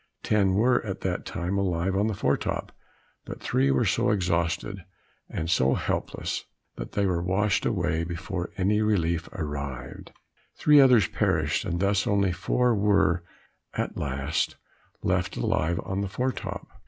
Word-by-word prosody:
Ten 100 Hz, -3 st, +2 dB
were 120 Hz, +5 st, +3 dB
at 100 Hz, -4 st, -5 dB
that 90 Hz, -1 st, -2 dB
time, 95 Hz, +2 st, -2 dB
alive 95 Hz, 0 st, 0 dB
on 100 Hz, +2 st, +2 dB
the 110 Hz, -, -1 dB
fore 70 Hz, -7 st, +2 dB
top, -, -, -3 dB, 0.5 s
but -, -, -8 dB
three 70 Hz, +1 st, +1 dB
were 65 Hz, -1 st, +2 dB
so -, -, +2 dB
exhausted, 90 Hz, 0 st, 0 dB, 0.5 s
and 80 Hz, -, -3 dB
so 65 Hz, -6 st, +3 dB
helpless, -, -, -2 dB, 0.3 s
that -, -, -7 dB
they 100 Hz, -, +1 dB
were 90 Hz, -3 st, +1 dB
washed 95 Hz, +3 st, +1 dB
away 85 Hz, -6 st, 0 dB
before 90 Hz, +2 st, -4 dB
any 105 Hz, +3 st, +2 dB
relief 85 Hz, -6 st, +1 dB
arrived; 70 Hz, -6 st, -6 dB, 0.5 s
three 150 Hz, -1 st, +6 dB
others 125 Hz, -8 st, +6 dB
perished, -, -, 0 dB
and 85 Hz, -, -2 dB
thus 100 Hz, +3 st, +1 dB
only 100 Hz, -3 st, +2 dB
four 120 Hz, +8 st, +1 dB
were, 100 Hz, -4 st, +2 dB, 0.5 s
at -, -, -2 dB
last, 70 Hz, +1 st, -1 dB, 0.5 s
left -, -, 0 dB
alive 85 Hz, +2 st, 0 dB
on 95 Hz, +1 st, -2 dB
the 100 Hz, -, -2 dB
fore 125 Hz, +7 st, -1 dB
top. -, -, -6 dB
95 Hz, 155 wpm, -26 LUFS, 85-100 Hz, 0.5 s, three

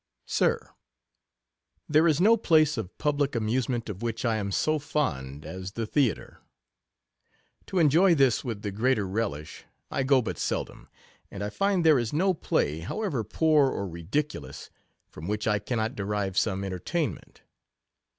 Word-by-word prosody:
Sir, -, -, 0 dB, 1.1 s
1 -, -, -10 dB
here 155 Hz, +3 st, +6 dB
is 155 Hz, -2 st, +3 dB
no 215 Hz, +5 st, +6 dB
place 155 Hz, -8 st, +3 dB
of 110 Hz, -6 st, -6 dB
public 145 Hz, -2 st, 0 dB
amuse 115 Hz, +3 st, 0 dB
ment 120 Hz, -2 st, -2 dB
of 100 Hz, -3 st, -6 dB
which 115 Hz, +1 st, -3 dB
I 115 Hz, -2 st, +2 dB
am 100 Hz, -2 st, -3 dB
so 155 Hz, +9 st, +1 dB
fond 75 Hz, -, -3 dB
as 95 Hz, +1 st, -7 dB
the 115 Hz, 0 st, -3 dB
Theatre. 125 Hz, -2 st, -1 dB, 1.3 s
To 190 Hz, -, -3 dB
enjoy 170 Hz, +3 st, +5 dB
this 135 Hz, -5 st, +3 dB
with 115 Hz, -6 st, -5 dB
the 105 Hz, -, -2 dB
greater 110 Hz, 0 st, +1 dB
relish 95 Hz, -7 st, -4 dB, 0.3 s
I -, -, 0 dB
go 135 Hz, 0 st, +4 dB
but 110 Hz, -, -4 dB
seldom; -, -, -3 dB, 0.4 s
and 100 Hz, -, -6 dB
I 105 Hz, -, -3 dB
find 195 Hz, -, +1 dB
there 155 Hz, -4 st, +6 dB
is 120 Hz, +1 st, -3 dB
no 185 Hz, +5 st, +2 dB
play, 80 Hz, -, 0 dB
how 155 Hz, -, -4 dB
ever 140 Hz, -, -1 dB
poor 150 Hz, +5 st, +3 dB
or 100 Hz, -6 st, -3 dB
ridiculous, 95 Hz, -, -4 dB, 0.4 s
from 80 Hz, +3 st, -9 dB
which 105 Hz, +1 st, -2 dB
I 105 Hz, -1 st, +2 dB
cannot 110 Hz, +2 st, -2 dB
derive 100 Hz, -3 st, -2 dB
some 100 Hz, -1 st, 0 dB
entertainment. 95 Hz, -, -4 dB
115 Hz, 160 wpm, -27 LUFS, 100-150 Hz, 1.3 s, here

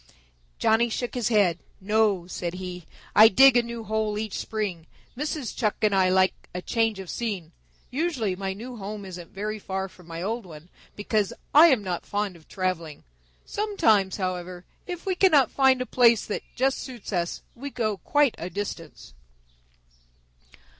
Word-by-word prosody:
Johnny 230 Hz, +2 st, +3 dB
shook 245 Hz, +2 st, -3 dB
his 245 Hz, -5 st, -1 dB
head. 195 Hz, -7 st, +3 dB, 0.2 s
"No," 210 Hz, -2 st, +2 dB
said 175 Hz, -1 st, -4 dB
he. 180 Hz, -2 st, -7 dB, 0.3 s
"I 215 Hz, +1 st, +10 dB
dig 265 Hz, +5 st, +7 dB
a 245 Hz, -, +6 dB
new 235 Hz, -1 st, -6 dB
hole 215 Hz, -1 st, -1 dB
each 215 Hz, -1 st, -3 dB
spring. 195 Hz, -7 st, -4 dB, 0.3 s
Mrs. 295 Hz, -1 st, -3 dB
Chuck 215 Hz, -3 st, 0 dB
and 210 Hz, -1 st, +3 dB
I 190 Hz, -1 st, +4 dB
like 185 Hz, 0 st, +1 dB
a 180 Hz, -, -3 dB
change 225 Hz, -3 st, +1 dB
of 190 Hz, -1 st, -8 dB
scene. 195 Hz, -7 st, -4 dB, 0.4 s
Usually 260 Hz, -, -1 dB
my 190 Hz, 0 st, -3 dB
new 240 Hz, +5 st, -8 dB
home 205 Hz, 0 st, -6 dB
isn't 180 Hz, -3 st, -9 dB
very 215 Hz, +2 st, -4 dB
far 190 Hz, -1 st, -3 dB
from 185 Hz, -2 st, -18 dB
my 165 Hz, 0 st, -6 dB
old 225 Hz, +4 st, -2 dB
one, 165 Hz, -1 st, -12 dB, 0.3 s
because 205 Hz, -1 st, 0 dB, 0.2 s
I 310 Hz, +4 st, +9 dB
am 260 Hz, -10 st, +3 dB
not 180 Hz, -3 st, -3 dB
fond 205 Hz, -2 st, -2 dB
of 160 Hz, -2 st, -18 dB
traveling. 180 Hz, -5 st, -3 dB, 0.4 s
Sometimes, 225 Hz, -, +1 dB
however, 180 Hz, -2 st, -4 dB, 0.2 s
if 355 Hz, 0 st, -6 dB
we 385 Hz, -, +1 dB
cannot 315 Hz, -, +4 dB
find 265 Hz, -2 st, +3 dB
a -, -, -11 dB
place 235 Hz, -3 st, +4 dB
that 210 Hz, -, -3 dB
just 265 Hz, +2 st, +1 dB
suits 245 Hz, -5 st, -8 dB
us, 175 Hz, -1 st, -2 dB
we 280 Hz, +4 st, -7 dB
go 220 Hz, -6 st, -1 dB
quite 290 Hz, +3 st, +2 dB
a 175 Hz, -, -4 dB
distance." 165 Hz, -, -6 dB
210 Hz, 165 wpm, -26 LUFS, 185-240 Hz, 0.4 s, I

